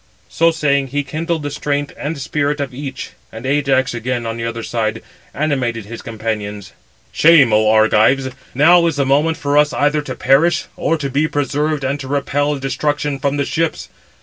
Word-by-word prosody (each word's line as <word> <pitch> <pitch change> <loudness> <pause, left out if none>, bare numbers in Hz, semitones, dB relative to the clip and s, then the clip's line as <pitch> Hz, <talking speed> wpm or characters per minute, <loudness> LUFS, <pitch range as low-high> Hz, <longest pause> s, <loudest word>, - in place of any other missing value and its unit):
So 165 0 +3
saying, 140 -4 +1
he 145 +2 -2
kindled 160 +3 -3
the 145 - -3
strength 145 0 -2
and 150 +2 -4
spirit 145 +2 -1
of 140 -2 -3
each: 135 0 -6 0.2
and 115 +3 -9
Ajax 135 -2 +1
again, 120 0 -3
on 115 0 -3
the 115 0 -4
other 115 0 -4
side, 110 -1 -2 0.3
animated 130 -7 -2
his 115 +2 -8
companions: 105 -3 -5 0.4
"Shame, 150 -8 +5
oh 110 0 +4
Argives! 110 +5 +3 0.3
now 170 +5 +5
is 165 - -1
the 140 -1 0
moment 150 +4 +2
for 145 +1 +2
us 150 0 +2
either 150 +1 +1
to 130 -3 -6
perish, 145 +6 +2
or 165 - 0
to 145 -3 -3
be 145 +4 +1
preserved 145 +1 -1
and 135 +2 -1
to 135 - -7
repel 145 +1 0
destruction 140 +1 -2
from 140 +1 -1
the 140 - 0
ships. 165 +2 -2
140 Hz, 180 wpm, -18 LUFS, 120-150 Hz, 0.4 s, Shame